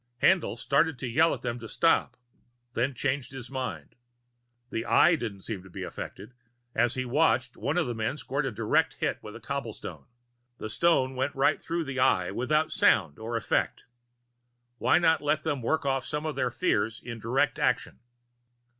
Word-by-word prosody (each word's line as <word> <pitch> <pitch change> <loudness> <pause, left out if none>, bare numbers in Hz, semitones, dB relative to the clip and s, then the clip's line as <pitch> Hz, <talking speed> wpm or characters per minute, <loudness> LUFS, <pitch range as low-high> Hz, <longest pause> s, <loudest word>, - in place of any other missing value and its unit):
Haendl 190 -3 +3
started 140 +1 +2
to 125 - -4
yell 155 +8 +4
at - - -4
them 120 -1 -2
to 115 - -8
stop, 165 - +2 0.6
then 130 +3 0
changed 130 +1 -1
his 130 -1 -8
mind. 130 -2 -4 0.8
The 115 - -2
Eye 170 +2 +5
didn't 110 -9 -5
seem 100 -1 -5
to 95 - -14
be - - -6
affected 105 +6 -7 0.4
as 120 -1 +2
he 130 0 -2
watched, 130 -2 +2
one 150 +4 -2
of 175 - +2
the 120 - -2
men 115 +5 -2
scored 140 -1 -2
a - - -2
direct 105 - +1
hit - - -1
with - - -9
a - - -8
cobblestone. - - -6 0.5
The 110 - -5
stone 135 -3 +3
went 130 +2 -1
right 135 - +2
through 170 0 -2
the 140 -2 -4
Eye, 95 -9 +3
without 150 +8 +1
sound 80 -7 +3
or 115 +1 -4
effect; 115 - 0 1.0
why 125 - +4
not 160 -3 +3
let 150 +1 +1
them 145 -5 -1
work 150 +6 0
off 135 -1 +1
some 150 +3 -3
of 155 - -2
their 130 -2 0
fears 115 - 0
in 115 -2 -7
direct 130 +6 +1
action? 125 - 0
130 Hz, 180 wpm, -28 LUFS, 115-150 Hz, 1.0 s, Eye